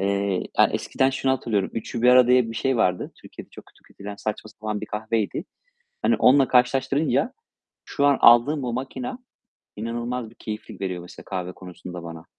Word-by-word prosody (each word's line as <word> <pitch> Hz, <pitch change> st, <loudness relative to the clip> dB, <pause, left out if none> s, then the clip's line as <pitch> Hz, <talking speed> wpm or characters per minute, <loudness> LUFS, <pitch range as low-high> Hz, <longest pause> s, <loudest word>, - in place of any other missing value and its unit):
eee, 100 Hz, -1 st, 0 dB, 0.2 s
ya, -, -, +7 dB
eskiden 130 Hz, 0 st, +1 dB
şunu 135 Hz, 0 st, 0 dB
hatırlıyorum: 110 Hz, -7 st, -1 dB
"3'ü 115 Hz, +1 st, -5 dB
1 125 Hz, -, +5 dB
arada." 125 Hz, -1 st, +7 dB
diye 125 Hz, -2 st, +4 dB
bir 115 Hz, -, -7 dB
şey 135 Hz, +2 st, 0 dB
vardı. 90 Hz, -5 st, +1 dB
Türkiye'de -, -, -11 dB
çok -, -, -13 dB
kötü -, -, -24 dB
kötülenen, 100 Hz, +1 st, -10 dB
saçma 110 Hz, +1 st, -4 dB
sapan 105 Hz, -1 st, -5 dB
bir 110 Hz, -, -6 dB
kahveydi. 110 Hz, -, -2 dB, 0.6 s
Hani, 235 Hz, -, +3 dB
onunla 135 Hz, +1 st, +5 dB
karşılaştırınca 135 Hz, -, +2 dB, 0.5 s
şu 140 Hz, -, 0 dB
an 140 Hz, -2 st, +4 dB
aldığım 120 Hz, +6 st, +6 dB
bu 120 Hz, -2 st, -2 dB
makine 135 Hz, -, -4 dB, 0.6 s
inanılmaz 120 Hz, +2 st, -4 dB
bir 115 Hz, -, -20 dB
keyiflik 105 Hz, -2 st, -8 dB
veriyor 90 Hz, -2 st, -3 dB
mesela 90 Hz, -, -12 dB
kahve 90 Hz, -2 st, -4 dB
konusunda 90 Hz, -1 st, -9 dB
bana. 80 Hz, -1 st, -9 dB
115 Hz, 175 wpm, -24 LUFS, 100-130 Hz, 0.6 s, ya